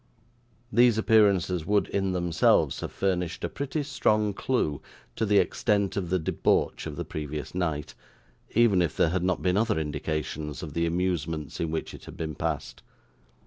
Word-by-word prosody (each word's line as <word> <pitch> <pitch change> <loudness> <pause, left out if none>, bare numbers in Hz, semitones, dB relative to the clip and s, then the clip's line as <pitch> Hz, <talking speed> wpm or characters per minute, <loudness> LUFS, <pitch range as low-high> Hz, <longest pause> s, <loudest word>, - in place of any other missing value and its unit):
These 120 0 +5
appearances 100 -6 +3
would 105 0 +2
in 95 -1 0
themselves 90 -2 +2
have - - -5
furnished 90 -3 -1
a - - -1
pretty 140 +2 -3
strong 110 -7 +1
clue 95 - -1 0.3
to 110 - -1
the 100 0 +4
extent 100 -1 +1
of 95 -3 -2
the 95 - +2
debauch 80 - 0
of - - -6
the - - -4
previous 75 -1 -5
night, 80 -5 -2 0.6
even 110 -5 +5
if 85 - -1
there 80 - +4
had 90 +2 0
not 95 0 0
been 90 +1 +2
other 110 0 +1
indications 75 0 -3
of 75 -3 -7
the 85 +1 +1
amusements 85 -4 -2
in 85 - -1
which 80 0 -3
it - - -11
had - - -10
been 80 -1 -3
passed. - - -4
90 Hz, 170 wpm, -27 LUFS, 80-105 Hz, 0.6 s, These